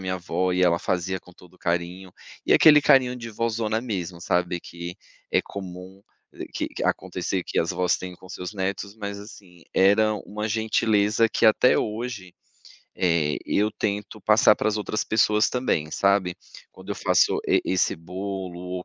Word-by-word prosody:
minha 95 0 -2
avó 90 +1 -1
e 90 - 0
ela 85 -1 +3
fazia 90 +1 -2
com 90 - -17
todo 90 +1 -19
carinho. 90 +2 -3 0.3
E - - +3
aquele 150 -2 +7
carinho 125 -3 +4
de 115 -2 -7
vózona 110 0 -1
mesmo, 90 -7 -5
sabe, 90 0 0
que 85 +1 -8 0.3
é - - +3
comum, 95 0 -9 0.5
que - - -2
que - - -7
acontecer 90 0 -2
que - - 0
as 85 - -1
avós 90 -1 +1
têm 90 -1 -8
com 95 - -15
seus 90 0 -6
netos. 100 +1 -4
Mas 100 -1 -5
assim, 90 -5 -14
era 105 +3 +4
uma 105 +1 -4
gentileza 110 0 +2
que 110 - +2
até 110 +3 +5
hoje, 105 -4 -4 0.6
eh, 80 -4 +1
eu 105 +1 +1
tento 105 +1 -3
passar 105 0 +5
para - - -1
as 110 - -1
outras 105 0 -2
pessoas 105 -1 +2
também, 100 -12 -1
sabe. 100 -2 +1 0.3
Quando - - -12
eu - - -1
faço - - +2
e - - +3
esse 95 -3 +1
bolo 95 +1 -6
ou 90 0 -5
95 Hz, 170 wpm, -24 LUFS, 90-105 Hz, 0.6 s, aquele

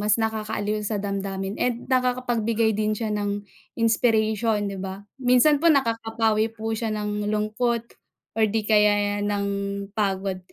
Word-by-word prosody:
mas 210 0 +3
nakakaaliw 215 -1 -2
sa 210 0 -2
damdamin 195 -1 -3
and 245 -1 0
nakakapagbigay 240 -3 +1
din 215 0 0
siya 220 -1 -2
ng 205 0 -2 0.3
inspiration, 220 -1 +2 0.2
'di 190 - -6
ba? 190 +1 -6 0.2
Minsan 255 +4 +4
po 335 - +4
nakakapawi 225 -5 +2
po 225 0 -5
siya 220 +1 -2
ng 210 -1 -2
lungkot 220 +3 -1 0.5
or 220 - +5
'di 215 +1 -1
kaya 205 -1 +3
ng 205 -1 -1 0.5
pagod. 195 -2 0
215 Hz, 135 wpm, -24 LUFS, 205-230 Hz, 0.5 s, or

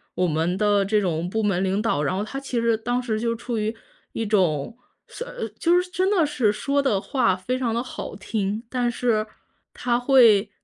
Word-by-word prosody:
我 180 - +1
们 165 +3 0
的 205 -1 +2
这 210 +1 +2
种 170 -3 -1
部 220 +4 -1
门 195 -3 +1
领 195 +2 0
导， 215 -10 0
然 150 +5 0
后 200 - -1
他 270 +6 -5
其 260 -4 -2
实 230 -1 +2
当 245 +3 -1
时 220 -3 -2
就 230 0 -1
处 240 0 -4
于 215 +1 -1 0.4
一 225 - -2
种， 185 -2 +1 0.3
算 - - -8
呃， - - -4
就 350 +1 +4
是 360 - -9
真 375 +2 0
的 355 -6 +3
是 255 -8 +1
说 280 +7 -1
得 220 -9 +1
话 250 -7 +1
非 240 +8 -3
常 240 -3 -1
地 235 - 0
好 255 - -7
听， 205 +1 -2
但 245 -1 0
是 230 -3 0 0.5
他 240 -1 0
会 230 -6 +5
225 Hz, 225 characters per minute, -24 LUFS, 200-250 Hz, 0.5 s, 会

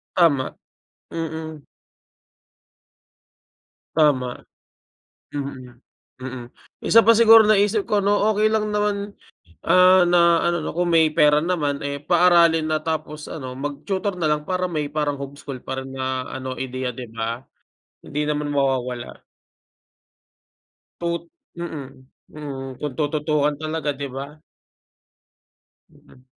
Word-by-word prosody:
Tama. 150 -7 +2 0.6
Mm. 160 -2 -6 2.3
Tama. 145 -5 +3 1.1
Mm. 130 -4 -7 0.4
Mm. 130 -1 -6 0.4
Isa 230 - +7
pa - - +8
siguro 225 -1 +8
naisip 210 0 +3
ko 210 - +3
'no, 205 - +3 0.2
okey 215 0 +2
lang 215 -1 0
naman, 210 0 0 0.7
ah, 185 0 +6
na 175 - +4 0.3
ano 175 0 +1
'no, - - -3
kung 175 +1 0
may 165 -1 +5
pera 150 -1 +5
naman, 150 -5 -1
eh, 140 0 -4
paaralin 170 -1 +4
na 155 0 0
tapos 155 -1 -4
ano, 130 -5 -6
mag-tutor 150 +9 -3
na 170 - -1
lang 150 0 0
para 185 -1 0
may 155 -5 -3
parang 145 -1 -2
homeschool 140 -1 -7
pa 130 - -5
rin 135 - -10
na 130 -1 -3
ano, 130 -1 -5
ideya, 130 -1 -3
'di 125 - -6
ba? 115 +2 -4 0.6
Hindi 150 - -3
naman 150 0 -1
mawawala. 130 -3 -2 1.8
Tut 170 0 -2 0.3
mm. 155 -6 -5 0.4
Mm, 135 -4 -7
kung 145 -3 -4
tututukan 150 -1 0
talaga, 155 -1 -3
'di 140 0 -5
ba? 140 +3 -7 1.5
Mm. 125 - -21
150 Hz, 120 wpm, -22 LUFS, 135-170 Hz, 2.3 s, pa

